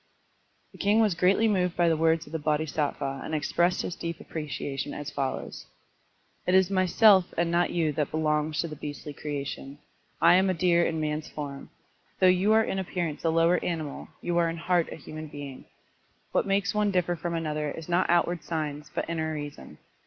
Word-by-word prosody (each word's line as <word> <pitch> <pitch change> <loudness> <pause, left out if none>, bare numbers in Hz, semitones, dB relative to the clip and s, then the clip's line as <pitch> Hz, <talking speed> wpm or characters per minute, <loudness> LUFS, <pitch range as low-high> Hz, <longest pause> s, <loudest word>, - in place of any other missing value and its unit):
The - - -16
Mng 205 +2 +3
was 215 -4 +4
greatly 185 +6 +3
moved 180 -4 +1
by 175 -1 +4
the 165 - +3
words 165 +1 +2
of - - -14
the 160 - -2
Bodhisattva 150 -2 -1
and 160 - -3
expressed 170 +4 +1
his 175 - -4
deep 170 -1 -4
appre 155 -2 -6
ciation 140 +1 -4
as 145 - -5
follows: 135 -2 -4 0.4
" - - -39
It 180 - +4
is 190 0 +4
myself 190 +1 +5
and 170 0 +1
not 175 +1 +2
you 165 -3 +1
that 150 -1 -1
belongs 150 -1 0
to 170 - -3
the 155 - -7
beastly 145 -1 -7
creation. 140 -1 -5 0.4
I 170 +1 +6
am 190 +1 +3
a 185 - +1
deer 170 0 +3
in 165 - 0
a - - -2
man's 155 0 -2
form. 140 -2 -7 0.5
Though - - +4
you 185 +3 +4
are 220 0 +5
in 195 - -2
appearance 175 -4 -3
a 165 - +2
lower 165 +2 +3
animal, 160 -5 -4
you 175 0 0
are 170 -1 +2
in 165 - -4
heart 175 0 +1
a - - -5
human 155 +1 -8
being. 145 -3 -9 0.7
What - - +1
makes 200 +2 +1
one 210 -1 +2
differ 180 -2 +1
from 170 +1 -3
another 150 -2 -2
is 160 +2 -7
not 175 +1 +1
out 175 0 +4
ward 175 -2 -4
signs 150 -2 -4
but - - -1
inner 160 -1 -2
reason. 145 - -8
165 Hz, 205 wpm, -27 LUFS, 150-180 Hz, 0.7 s, I